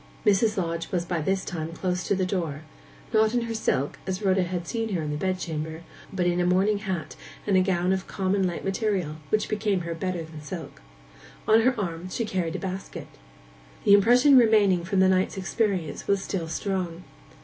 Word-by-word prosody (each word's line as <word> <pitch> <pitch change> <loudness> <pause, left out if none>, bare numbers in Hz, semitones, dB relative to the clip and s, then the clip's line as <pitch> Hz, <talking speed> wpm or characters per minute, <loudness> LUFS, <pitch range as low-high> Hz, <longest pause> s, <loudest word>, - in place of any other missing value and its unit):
Mrs. 210 +1 +3
Lodge 170 -2 -2
was 175 -2 0
by 170 -2 -2
this 190 +4 0
time 165 -2 -4
close 180 +1 -2
to - - +2
the 190 -1 0
door—not 180 +6 -2
in 240 - +2
her 230 -1 -3
silk, 145 -10 -1
as 190 0 -2
Rhoda 190 -1 +3
had 175 -1 -3
seen 225 -3 -2
her 165 - -1
in 150 - -3
the - - -2
bed 185 +4 -1
chamber, 160 -1 -5 0.3
but 185 -2 -1
in 175 0 +1
a - - +2
morning 195 +3 +2
hat, 190 -6 -4 0.3
and 190 -3 +3
gown 185 -1 +1
of 190 0 -3
common 190 0 0
light 175 - -5
material, 195 -6 -1
which 215 - +1
became 210 -3 0
her 170 0 -4
better 175 0 -3
than 160 -1 -10
silk. 160 -1 -8 0.7
On 220 +1 +6
her 255 +2 +2
arm 175 -2 -4
she 230 +5 -2
carried 180 -5 -2
a - - -2
basket. 190 0 -6 0.7
The 200 - +6
impression 245 +7 +7
remaining 205 -6 +4
from 190 +1 +1
the 190 - +6
night's 185 +1 +1
experience 190 -5 -1
was 200 -1 +1
still 175 -4 -3
strong. 180 -1 -3
185 Hz, 195 wpm, -26 LUFS, 170-200 Hz, 0.7 s, impression